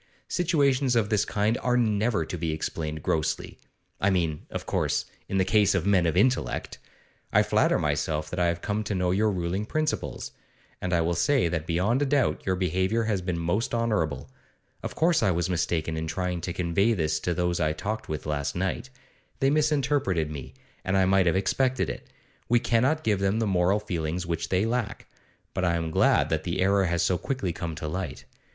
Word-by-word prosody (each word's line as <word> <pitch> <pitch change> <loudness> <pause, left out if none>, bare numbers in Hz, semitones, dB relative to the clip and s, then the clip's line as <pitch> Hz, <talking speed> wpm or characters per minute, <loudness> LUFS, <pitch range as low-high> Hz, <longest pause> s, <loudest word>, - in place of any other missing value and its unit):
Situations 140 -7 +2
of 110 -3 +2
this 105 -1 +2
kind 105 +3 0
are 125 0 +2
never 110 -5 +1
to 90 - -5
be 80 -2 -2
explained 80 -1 -4
grossly; 80 - -1 0.4
I 100 - +2
mean, 85 -5 -1
of - - -5
course, - - 0 0.2
in 95 - 0
the 95 - +3
case 105 0 +3
of 95 -2 0
men 95 -4 +3
of 80 - 0
intellect. 125 +6 +1 0.5
I - - +5
flatter - - +2
myself 75 +1 -1
that 90 - -3
I 90 - +3
have 85 0 -2
come 105 +1 -1
to 100 - -2
know 90 -1 +1
your 105 +4 +2
ruling 90 +1 -2
principles; 155 +7 -2 0.5
and 90 - -2
I 85 -2 +3
will 85 +1 +1
say 105 +2 +2
that 80 -1 -3
beyond 95 +10 +1
a 145 - +2
doubt 140 -1 +1
your 95 - +2
behaviour 95 +5 0
has 105 -4 0
been 90 -1 -2
most 90 +9 -1
honourable. 105 -10 -1 0.5
Of - - -5
course 165 0 +3
I 105 - +3
was 85 0 0
mistaken 80 -2 -1
in 80 0 -3
trying 90 +1 -2
to 90 - -3
convey 90 +6 +1
this 80 -5 0
to 85 +2 -2
those 90 0 0
I 75 -2 +2
talked 105 +8 -4
with 75 -1 -4
last 75 -2 -2
night; 95 +8 -2 0.5
they 135 +1 +3
misinterpreted 140 - +1
me, 65 -3 -8 0.3
and 95 +1 +1
I 95 - +4
might 95 -1 +3
have 85 - +3
expected 130 +7 +1
it. - - -9 0.4
We 120 +1 +5
cannot 130 +8 +1
give 105 -3 +1
them 100 +2 +1
the 115 - +1
moral 95 +1 +2
feelings 90 -3 -3
which 85 -1 -3
they 95 +3 +2
lack. 115 -2 -2 0.5
But 95 - -2
I 85 -2 +2
am 80 -1 -2
glad - - +3
that 80 -1 0
the 90 +1 -2
error 95 +1 +3
has 85 0 +1
so 90 - +1
quickly 115 -11 -2
come 85 -1 -5
to 80 0 -5
light. 90 +4 -4
95 Hz, 200 wpm, -27 LUFS, 85-110 Hz, 0.5 s, I